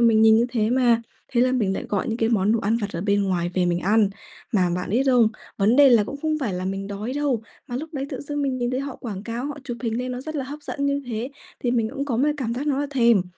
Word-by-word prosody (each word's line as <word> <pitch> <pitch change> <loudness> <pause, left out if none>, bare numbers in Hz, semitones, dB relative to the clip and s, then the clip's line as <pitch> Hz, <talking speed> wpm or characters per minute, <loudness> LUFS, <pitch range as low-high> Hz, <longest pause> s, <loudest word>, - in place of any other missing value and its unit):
mình 220 -1 +5
nhìn 220 0 +7
như 235 +2 +3
thế 220 -2 +1
mà, 240 -2 +3 0.3
thế 240 - +3
là 255 +1 +3
mình 220 -7 +1
lại - - -4
gọi 200 +1 -1
những 225 - -1
cái 225 -1 +1
món 210 -2 +2
đồ 230 - +2
ăn 220 +3 +1
vặt 205 -3 -3
ở 170 - -3
bên 200 +1 +2
ngoài 175 -3 0
về 180 -1 +2
mình 175 0 +1
ăn. 205 +2 +3 0.4
Mà 180 -4 +3
bạn 180 0 -3
biết 240 +6 +3
không? 245 -4 +5 0.3
Vấn 215 +4 +3
đề 285 -1 +8
là 230 -4 +5
cũng 280 - -6
không 310 -1 0
phải 235 -9 -2
là 180 +1 -3
mình 195 +1 -3
đói 205 +4 -4
đâu, 275 -5 0 0.3
mà 245 - -3
lúc 310 +5 -5
đấy 275 0 -2
tự - - -5
dưng 290 0 -3
mình 265 -2 -1
nhìn 240 0 -1
thấy 255 - -1
họ 275 -1 -5
quảng 200 -5 -6
cáo, 235 +4 -4
họ 290 0 -5
chụp 240 -4 -4
hình 230 -1 -1
lên 250 0 -3
nó 250 - -4
rất 310 +3 -6
là 275 - -2
hấp 285 +3 -7
dẫn 280 0 -2
như 280 0 0
thế 235 +2 -3 0.3
thì 245 - 0
mình 230 -3 +1
cũng 275 - -2
có 255 -5 -1
một 280 +5 +3
cảm 235 -5 -2
giác 275 +5 -3
nó 275 -2 +1
là 290 - -1
thèm, 235 -7 +4
235 Hz, 305 wpm, -24 LUFS, 210-270 Hz, 0.4 s, đề